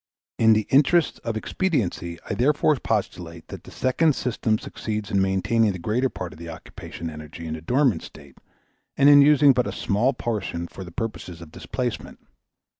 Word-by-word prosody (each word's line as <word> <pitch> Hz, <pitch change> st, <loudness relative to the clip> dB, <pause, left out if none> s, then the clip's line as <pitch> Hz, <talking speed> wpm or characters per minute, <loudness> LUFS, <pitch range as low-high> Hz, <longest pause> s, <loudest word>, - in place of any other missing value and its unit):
In 110 Hz, -1 st, +6 dB
the 110 Hz, -1 st, +1 dB
interests 150 Hz, +4 st, +3 dB
of 115 Hz, -2 st, -3 dB
expediency 110 Hz, -, -2 dB
I -, -, -2 dB
therefore 145 Hz, +7 st, +2 dB
postulate 85 Hz, -8 st, -4 dB
that -, -, -9 dB
the -, -, -11 dB
second 140 Hz, +4 st, +1 dB
system 115 Hz, -3 st, 0 dB
succeeds 105 Hz, -1 st, -5 dB
in 100 Hz, -, +2 dB
maintaining 100 Hz, +3 st, +1 dB
the -, -, -6 dB
greater 115 Hz, +9 st, 0 dB
part 90 Hz, -7 st, -7 dB
of 80 Hz, -, -15 dB
the 85 Hz, 0 st, -8 dB
occupation 80 Hz, +1 st, -9 dB
energy 75 Hz, +1 st, -9 dB
in 80 Hz, 0 st, -4 dB
a 80 Hz, -, -9 dB
dormant 125 Hz, -, +1 dB
state -, -, -14 dB, 0.6 s
and 140 Hz, -, +5 dB
in 145 Hz, 0 st, +9 dB
using 145 Hz, -1 st, +6 dB
but 125 Hz, -3 st, 0 dB
a -, -, -3 dB
small 105 Hz, +7 st, 0 dB
portion 105 Hz, -8 st, -3 dB
for 95 Hz, -, -9 dB
the 85 Hz, -, -10 dB
purposes 90 Hz, -4 st, -5 dB
of 85 Hz, -2 st, -12 dB
displacement. -, -, -5 dB
110 Hz, 180 wpm, -24 LUFS, 85-130 Hz, 0.6 s, in